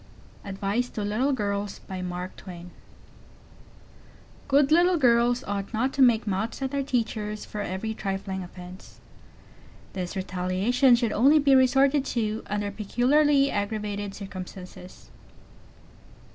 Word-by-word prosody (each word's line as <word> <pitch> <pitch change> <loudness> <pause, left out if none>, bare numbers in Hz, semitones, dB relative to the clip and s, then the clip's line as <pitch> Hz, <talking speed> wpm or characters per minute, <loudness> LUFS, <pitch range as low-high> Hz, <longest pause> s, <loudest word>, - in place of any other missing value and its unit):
ADVICE 200 +5 -2
TO 210 - -5
LITTLE 220 +7 0
GIRLS 205 -5 -2 2.7
Good 280 +1 +3
little 350 +2 +5
girls 245 -2 +3
ought 200 0 -4
not 255 +4 0
to 275 - 0
make 235 -3 +5
mouths 210 +3 -2
at 265 - -2
their 280 -1 -1
teachers 220 -5 -2
for 210 - -6
every 205 +3 -3
trifling 195 -2 -4
offense. 180 +1 -12 0.9
This 180 -1 -4
retaliation 190 +7 +2
should 235 -2 0
only 275 +7 +5
be 280 -2 +4
resorted 270 +2 +4
to 220 -1 -1
under 205 0 -2
peculiarly 275 +7 +2
aggravated 205 -1 -3
circumstances. 185 -1 -10
215 Hz, 110 wpm, -26 LUFS, 200-260 Hz, 2.7 s, little